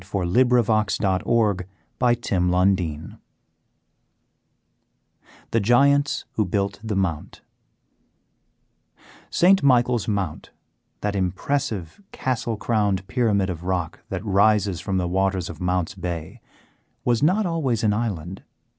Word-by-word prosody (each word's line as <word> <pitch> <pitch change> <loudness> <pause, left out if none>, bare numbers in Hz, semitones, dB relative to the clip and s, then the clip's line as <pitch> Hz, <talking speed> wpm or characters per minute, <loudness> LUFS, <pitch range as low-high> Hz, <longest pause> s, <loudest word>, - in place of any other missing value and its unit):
[Illustration: 105 0 +1
Truro 110 -1 +2 0.4
Cathedral] 95 -5 +1 2.3
THE 115 - +2
GIANTS 140 +6 +3
WHO 110 - 0
BUILT 100 +2 -2
THE 110 -2 -3
MOUNT 85 -6 -3 1.9
St. 190 +2 +4
Michael's 125 -4 +3
Mount, 100 -7 -3 0.5
that 105 0 -2
impressive 95 - -2
castle 120 -3 -2
crowned 105 -4 0
pyramid 100 -5 +1
of 85 -1 -7
rock 90 -3 -2
that - - -5
rises 100 -2 +2
from 95 -2 -2
the 90 -1 0
waters 95 -1 0
of 80 - -12
Mounts 90 -2 -1
Bay, 85 -3 -6 0.6
was 120 -2 +2
not 185 +8 +3
always 145 - -1
an 105 -2 +3
island. 95 -5 -3
100 Hz, 100 wpm, -23 LUFS, 90-120 Hz, 2.3 s, St